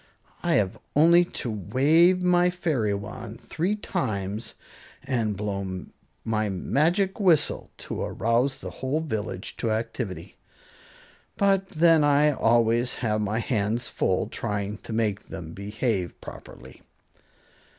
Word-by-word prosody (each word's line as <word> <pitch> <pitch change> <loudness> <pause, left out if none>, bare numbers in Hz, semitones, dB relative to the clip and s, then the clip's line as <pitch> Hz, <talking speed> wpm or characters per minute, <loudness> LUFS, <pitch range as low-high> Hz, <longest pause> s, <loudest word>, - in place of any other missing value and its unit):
I - - +2
have 100 -3 +1 0.2
only 170 +4 +6
to 125 -8 -5
wave 155 - +3
my 180 0 +4
fairy 155 - 0
wand 110 +2 -7
three 180 +6 -1
times 105 - -3 0.5
and 115 -7 -1
blow 100 -2 -3 0.4
my 110 -1 0
magic 165 - +1
whistle 180 -7 +2 0.2
to - - -4
arouse 125 +4 0
the - - -6
whole 135 +4 -2
village 110 - -4
to 115 - -1
activity. 110 -2 -4 1.0
But 195 -1 +2
then 165 -3 +4
I 145 +1 +4
always 120 0 +2
have 105 -1 +1
my 105 +1 -1
hands 115 0 -1
full - - 0
trying 105 0 -3
to - - -10
make 110 -3 -1
them 80 -3 -8
behave 100 -2 -2
properly." - - -12
115 Hz, 120 wpm, -26 LUFS, 105-160 Hz, 1.0 s, only